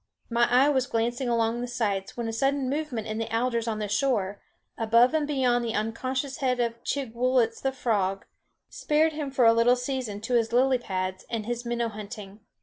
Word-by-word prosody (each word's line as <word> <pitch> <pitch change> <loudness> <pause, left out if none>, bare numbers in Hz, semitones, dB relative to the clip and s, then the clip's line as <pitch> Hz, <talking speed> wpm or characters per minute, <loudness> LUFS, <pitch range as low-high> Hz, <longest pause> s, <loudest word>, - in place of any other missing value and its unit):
My 235 +1 +3
eye 255 +3 +5
was 260 -3 +2
glancing 240 +2 -1
along 230 0 +1
the 245 - -3
sights 210 -2 -2
when 235 -1 -2
a 225 - -3
sudden 270 +3 0
movement 280 -7 -3
in 215 0 -4
the 225 - -3
alders 235 0 0
on 220 -1 -1
the 210 -1 -3
shore, 205 -3 0 0.3
above 230 +4 +4
and 310 -2 +1
beyond 255 -4 +1
the 230 -1 -2
unconscious 255 +5 -2
head 255 -2 0
of 235 -1 -2
Chigwooltz 250 -3 0
the 270 - 0
frog, 200 -7 -1 0.4
spared 310 +1 +1
him 300 -2 -4
for 260 -3 +2
a 230 - +7
little 230 +2 +4
season 250 -5 -3
to 225 +3 -3
his 230 -2 +2
lily 255 +1 +3
pads 185 -4 -3
and 225 -3 -3
his 240 +1 -4
minnow 235 -1 -1
hunting. 210 -1 -9
240 Hz, 195 wpm, -27 LUFS, 225-260 Hz, 0.4 s, a